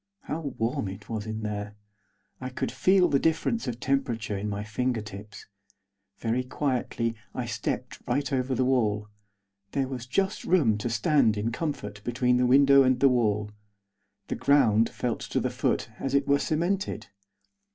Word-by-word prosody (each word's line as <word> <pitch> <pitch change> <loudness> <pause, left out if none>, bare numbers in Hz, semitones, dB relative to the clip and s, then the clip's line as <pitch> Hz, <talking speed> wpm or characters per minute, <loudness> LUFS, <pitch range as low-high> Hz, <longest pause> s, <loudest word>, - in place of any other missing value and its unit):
How 155 - -4
warm 120 -7 -2
it 95 +2 -9
was 110 -2 -4
in 110 0 -4
there! 105 0 -4 0.6
I 130 - -5
could 130 - -3
feel 185 -1 +4
the 140 - +2
difference 165 - 0
of 120 -1 -3
temperature 120 -6 -1
in 100 +2 -3
my 100 0 -3
fingertips. 110 -2 -4 0.7
Very 120 +2 -1
quietly 125 -3 -1 0.2
I - - -2
stepped - - -4
right 140 +3 0
over 130 0 0
the 130 - +1
wall. 105 -5 +1 0.6
There 135 -2 0
was 130 -2 -6
just 195 +9 0
room 135 - +3
to 120 - -2
stand 125 -4 +3
in 110 +3 -1
comfort 105 -8 -4
between 125 0 +1
the 125 0 +3
window 140 +1 +6
and 130 -1 +3
the 140 - +6
wall. 105 -4 +1 0.8
The - - -2
ground 115 -6 +4
felt 120 -2 -2
to - - -2
the - - -1
foot 110 - -1
as 135 0 -1
if 140 - +4
it - - -23
were 140 0 +4
cemented. 170 - -1
125 Hz, 165 wpm, -27 LUFS, 110-140 Hz, 0.8 s, window